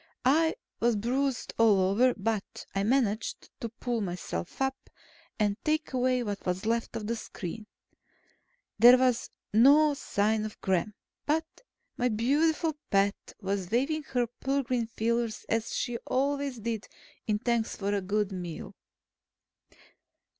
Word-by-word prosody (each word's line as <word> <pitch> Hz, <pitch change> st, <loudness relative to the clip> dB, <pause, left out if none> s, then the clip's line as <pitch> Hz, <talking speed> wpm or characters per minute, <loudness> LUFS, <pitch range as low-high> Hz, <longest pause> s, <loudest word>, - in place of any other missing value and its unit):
I 320 Hz, +5 st, +4 dB, 0.2 s
was 235 Hz, 0 st, +3 dB
bruised 255 Hz, +5 st, -1 dB
all 220 Hz, -4 st, +6 dB
over, 205 Hz, +7 st, +3 dB
but 215 Hz, 0 st, -3 dB
I 195 Hz, -, 0 dB
managed 225 Hz, -2 st, 0 dB
to 230 Hz, -, -4 dB
pull 235 Hz, 0 st, -3 dB
myself 175 Hz, -, -4 dB
up 265 Hz, 0 st, -2 dB, 0.5 s
and 205 Hz, -2 st, +1 dB
take 310 Hz, -1 st, 0 dB
away 255 Hz, -1 st, +2 dB
what 205 Hz, -3 st, -4 dB
was 180 Hz, +3 st, -2 dB
left 230 Hz, +1 st, -1 dB
of 215 Hz, -, -4 dB
the 230 Hz, +2 st, -1 dB
screen. 210 Hz, -1 st, -7 dB, 1.1 s
There 245 Hz, +2 st, +9 dB
was 250 Hz, -2 st, +1 dB, 0.2 s
no 290 Hz, +7 st, +6 dB
sign 215 Hz, -4 st, 0 dB
of 215 Hz, -1 st, -6 dB
Gremm, 190 Hz, +2 st, 0 dB, 0.3 s
but 315 Hz, +2 st, +2 dB, 0.5 s
my 250 Hz, 0 st, +2 dB
beautiful 300 Hz, +8 st, +1 dB
pet 200 Hz, +1 st, +1 dB
was 195 Hz, -2 st, -2 dB
waving 275 Hz, +8 st, +1 dB
her 245 Hz, -1 st, +3 dB
pearl 270 Hz, +4 st, -2 dB
green 245 Hz, -3 st, -1 dB
feelers 230 Hz, 0 st, -1 dB
as 225 Hz, 0 st, -1 dB
she 240 Hz, -2 st, -2 dB
always 280 Hz, 0 st, 0 dB
did 225 Hz, -1 st, -3 dB, 0.4 s
in 210 Hz, -1 st, +2 dB
thanks 235 Hz, 0 st, 0 dB
for 200 Hz, 0 st, -2 dB
a 200 Hz, -, 0 dB
good 205 Hz, +1 st, 0 dB
meal. 175 Hz, -3 st, -6 dB
230 Hz, 140 wpm, -29 LUFS, 205-260 Hz, 1.1 s, There